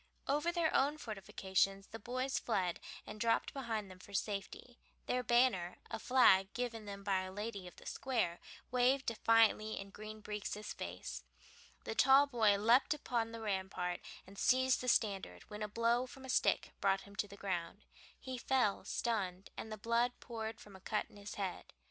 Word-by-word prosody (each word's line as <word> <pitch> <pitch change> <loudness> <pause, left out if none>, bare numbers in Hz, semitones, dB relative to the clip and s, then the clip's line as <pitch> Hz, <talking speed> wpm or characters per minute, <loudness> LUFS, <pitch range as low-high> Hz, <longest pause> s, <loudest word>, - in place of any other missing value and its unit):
Over 295 +5 +2
their 340 -2 +1
own 285 +3 +3
fortifications 195 -4 -1
the 225 - -7
boys 255 +4 -1
fled 185 -7 0 0.3
and 215 - -8
dropped 230 -1 +2
behind 225 -7 -3
them 185 - -12
for 200 +2 -10
safety. 210 +5 -4 0.3
Their 250 - 0
banner, 240 -7 +3
a - - -3
flag 195 -7 +5
given 230 -3 -3
them 200 -1 -7
by 195 -2 +1
a 185 0 -6
lady 205 -1 -5
of 175 - -12
the - - -15
Square, 230 -10 -1 0.3
waved 255 +2 +3
defiantly 225 -1 +3
in 195 0 -8
Green 215 +1 -8
Breeks' 210 0 -5
face. 65 -9 -6 0.6
The - - -3
tall 270 +4 +7
boy 225 -7 +3
leaped 235 +8 +4
upon 235 -6 -1
the 230 0 -7
rampart 190 -4 -2 0.3
and 195 +1 -12
seized 260 0 +4
the 250 - -4
standard, 195 - +1
when 210 +1 -6
a 210 - -1
blow 230 +3 +1
from 265 +1 -11
a - - -9
stick - - +2
brought 195 -1 +3
him 200 +1 -14
to 205 - 0
the 200 0 -12
ground. 185 +1 -3 0.4
He 260 -1 -5
fell 250 -6 +2
stunned, 195 -5 -2
and 220 - -6
the 215 - -4
blood 235 +3 +1
poured 225 -2 -5
from 205 -2 -13
a 190 - -13
cut 210 +2 -2
in - - -15
his 205 0 -7
head. 195 -3 -4
215 Hz, 180 wpm, -36 LUFS, 195-245 Hz, 0.6 s, tall